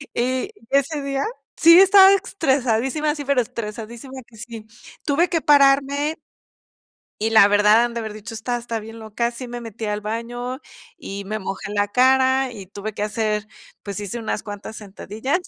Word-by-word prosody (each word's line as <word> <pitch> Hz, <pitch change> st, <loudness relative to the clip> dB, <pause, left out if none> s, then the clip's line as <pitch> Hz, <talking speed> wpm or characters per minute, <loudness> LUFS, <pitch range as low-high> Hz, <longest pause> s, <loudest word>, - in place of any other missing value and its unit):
Y 255 Hz, +8 st, -1 dB, 0.2 s
ese 280 Hz, +2 st, +1 dB
día, 275 Hz, 0 st, -2 dB, 0.3 s
sí 335 Hz, +2 st, +8 dB
estaba 385 Hz, 0 st, +8 dB
estresadísima, 280 Hz, -, 0 dB
sí, 290 Hz, -2 st, -6 dB
pero 275 Hz, -2 st, +2 dB
estresadísima 235 Hz, +4 st, -7 dB
que 225 Hz, -, -18 dB
sí. 225 Hz, -1 st, -9 dB, 0.4 s
Tuve 310 Hz, +4 st, +2 dB
que 330 Hz, -2 st, 0 dB
pararme 285 Hz, +1 st, +3 dB, 1.0 s
y, 220 Hz, +1 st, 0 dB
la 220 Hz, -3 st, +7 dB
verdad, 210 Hz, +3 st, +4 dB
han 240 Hz, -, -5 dB
de 235 Hz, -, -3 dB
haber 220 Hz, -2 st, -5 dB
dicho: 215 Hz, +2 st, -9 dB
"Esta 235 Hz, +2 st, -3 dB
está 235 Hz, -1 st, -4 dB
bien 225 Hz, +1 st, -10 dB
loca". 225 Hz, +2 st, -2 dB
Sí 245 Hz, +1 st, -8 dB
me 240 Hz, 0 st, -7 dB
metí 225 Hz, -1 st, -7 dB
al 210 Hz, 0 st, -2 dB
baño, 240 Hz, +4 st, -5 dB, 0.4 s
y 200 Hz, +1 st, -7 dB
me 215 Hz, +2 st, -4 dB
mojé 195 Hz, +1 st, -6 dB
la 205 Hz, 0 st, +1 dB
cara, 260 Hz, +3 st, +3 dB
y 205 Hz, -5 st, -9 dB
tuve 205 Hz, +2 st, -7 dB
que 205 Hz, -, -3 dB
hacer 210 Hz, 0 st, -2 dB, 0.4 s
pues, 200 Hz, 0 st, -5 dB
hice 205 Hz, +3 st, -5 dB
unas 220 Hz, -2 st, -3 dB
cuantas 205 Hz, +1 st, -8 dB
sentadillas. 215 Hz, -, -4 dB
235 Hz, 170 wpm, -21 LUFS, 215-270 Hz, 1.0 s, sí